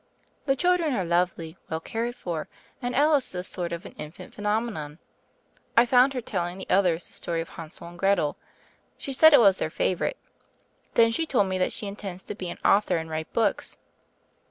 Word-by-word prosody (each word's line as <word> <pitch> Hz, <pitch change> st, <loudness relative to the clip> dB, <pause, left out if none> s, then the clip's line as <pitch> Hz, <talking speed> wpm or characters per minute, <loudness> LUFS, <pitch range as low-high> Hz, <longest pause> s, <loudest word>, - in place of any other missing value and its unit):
"The 270 Hz, -, +3 dB
children 350 Hz, -3 st, +2 dB
are 190 Hz, -5 st, -1 dB
lovely, 170 Hz, -1 st, 0 dB
well 160 Hz, -, -2 dB
cared 230 Hz, +7 st, -3 dB
for, 170 Hz, -9 st, -4 dB, 0.3 s
and 245 Hz, -1 st, -2 dB
Alice 290 Hz, -1 st, +3 dB
is -, -, -8 dB
a 180 Hz, -, -3 dB
sort 180 Hz, -2 st, -3 dB
of 170 Hz, 0 st, -5 dB
an -, -, -8 dB
infant 150 Hz, +2 st, -9 dB
phenomenon. 210 Hz, -8 st, -2 dB, 0.8 s
I 235 Hz, -, +8 dB
found 255 Hz, +2 st, +5 dB
her 250 Hz, -, -1 dB
telling 180 Hz, -5 st, -3 dB
the 190 Hz, -, -7 dB
others 180 Hz, -3 st, +3 dB
the -, -, -7 dB
story 170 Hz, -1 st, -2 dB
of 165 Hz, -, -4 dB
Hansel 165 Hz, +1 st, -9 dB
and 175 Hz, 0 st, -12 dB
Gretel. 195 Hz, -6 st, +2 dB, 0.6 s
She 275 Hz, -, -5 dB
said 315 Hz, +4 st, +8 dB
it 290 Hz, -, +8 dB
was 195 Hz, -4 st, +6 dB
their -, -, -1 dB
favorite. 185 Hz, -, -1 dB, 0.8 s
Then 230 Hz, 0 st, +5 dB
she 325 Hz, +8 st, -1 dB
told 245 Hz, -9 st, +3 dB
me 185 Hz, 0 st, -1 dB
that 185 Hz, -, +1 dB
she -, -, -3 dB
intends 200 Hz, -2 st, -7 dB
to -, -, -6 dB
be 185 Hz, -3 st, -6 dB
an -, -, -6 dB
author 205 Hz, -3 st, +4 dB
and 160 Hz, 0 st, -5 dB
write 155 Hz, 0 st, -4 dB
books." 220 Hz, -4 st, 0 dB
195 Hz, 200 wpm, -26 LUFS, 170-240 Hz, 0.8 s, I